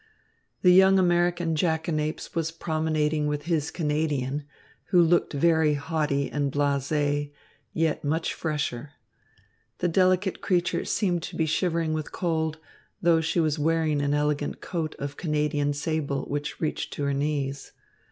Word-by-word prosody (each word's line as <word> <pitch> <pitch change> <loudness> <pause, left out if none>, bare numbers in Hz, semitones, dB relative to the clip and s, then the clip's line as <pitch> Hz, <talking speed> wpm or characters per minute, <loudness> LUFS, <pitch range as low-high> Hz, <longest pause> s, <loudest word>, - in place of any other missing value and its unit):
The 180 - +7
young 190 +1 +6
American 175 -2 +2
jackanapes 160 -1 -1
was 165 -1 -1
promenading 155 -2 -1
with 150 0 -2
his 160 -3 0
Canadian, 150 -3 -1 0.4
who 180 - +3
looked 170 0 +3
very 160 0 +3
haughty 145 -2 -1
and 145 -2 -1
blasé, 145 +1 0 0.4
yet 160 -2 0
much 160 +3 -1
fresher. 150 -3 -3 0.8
The 180 - 0
delicate 185 +2 +2
creature 175 -2 0
seemed 180 -5 0
to - - -7
be 160 - +1
shivering 165 0 0
with 155 -1 -4
cold, 160 -3 -1 0.4
though 165 -1 +3
she 160 +2 0
was 155 -1 +1
wearing 155 -1 +1
an 145 0 +1
elegant 145 0 -1
coat 160 -3 -4
of 140 +1 -5
Canadian 150 -2 0
sable, 145 -1 -2
which 145 +1 -4
reached 155 - -2
to 145 - -4
her 140 0 0
knees. 140 -1 -2
155 Hz, 140 wpm, -26 LUFS, 145-165 Hz, 0.8 s, The